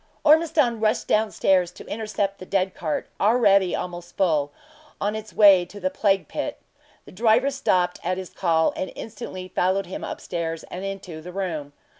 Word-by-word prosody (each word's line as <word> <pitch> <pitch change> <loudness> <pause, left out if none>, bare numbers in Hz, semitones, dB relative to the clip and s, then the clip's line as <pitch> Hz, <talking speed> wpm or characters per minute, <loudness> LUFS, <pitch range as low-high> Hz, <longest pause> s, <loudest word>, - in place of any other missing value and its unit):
Ormiston 305 -6 +4
rushed 215 0 +1
down 215 0 +2
stair 190 -3 +3
to 175 - -11
intercept 205 -2 -3
the 185 - -8
dead 190 -1 0
cart, 155 -3 -3
already 200 -4 +4
almost 175 -1 -6
full 155 -6 +2 0.5
on 205 +1 -1
it 220 0 -7
way 200 -4 +7
to 205 +4 -11
the 185 -1 -1
plague 195 -2 +1
pit. - - -4 0.5
The - - -13
driver 230 +6 +3
stopped 185 -10 +1
at 180 +1 -1
his 185 -1 -7
call, 165 -3 +1
and 185 - -4
instantly 195 -5 -7
followed 185 +2 +1
him 185 - -7
up - - -5
stairs, 165 -2 -4
and 185 - -5
into 195 -5 -6
the 180 +3 -9
room. 165 -7 -4
190 Hz, 175 wpm, -24 LUFS, 180-215 Hz, 0.5 s, way